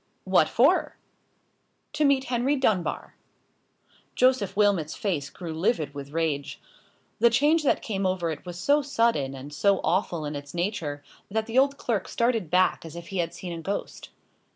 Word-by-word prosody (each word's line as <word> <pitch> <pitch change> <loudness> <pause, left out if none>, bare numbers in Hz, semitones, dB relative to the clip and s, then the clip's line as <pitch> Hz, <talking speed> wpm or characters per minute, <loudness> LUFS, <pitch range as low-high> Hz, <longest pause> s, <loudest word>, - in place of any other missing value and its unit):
"What - - +3
for?" - - +3 1.0
"To 305 - 0
meet 275 -2 +3
Henry 255 +3 0
Dunbar." 215 -10 -1 1.0
Joseph 245 -6 +2
Wilmot's 195 -7 +2
face 155 -9 -2
grew 170 -3 -7
livid 160 -4 0
with 140 -1 -7
rage. 150 -3 -2 0.6
The 235 +2 +6
change 295 +8 +3
that 290 - +1
came 195 -3 -1
over 180 -3 -1
it 155 - -7
was 175 -1 -8
so 285 +11 +3
sudden 230 - 0
and 140 +2 -9
so 200 +5 +2
awful 175 -4 0
in 145 0 -4
its 145 +2 -8
nature, 170 -6 -3 0.3
that 220 +2 -1
the 230 +3 +2
old 275 +1 +2
clerk 225 -9 -2
started 230 -7 0
back 185 +2 +2
as 165 0 -9
if 170 0 -9
he 195 - -3
had 170 -1 -1
seen 180 -2 -6
a 165 - -6
ghost. 195 +5 -5
185 Hz, 170 wpm, -26 LUFS, 160-235 Hz, 1.0 s, The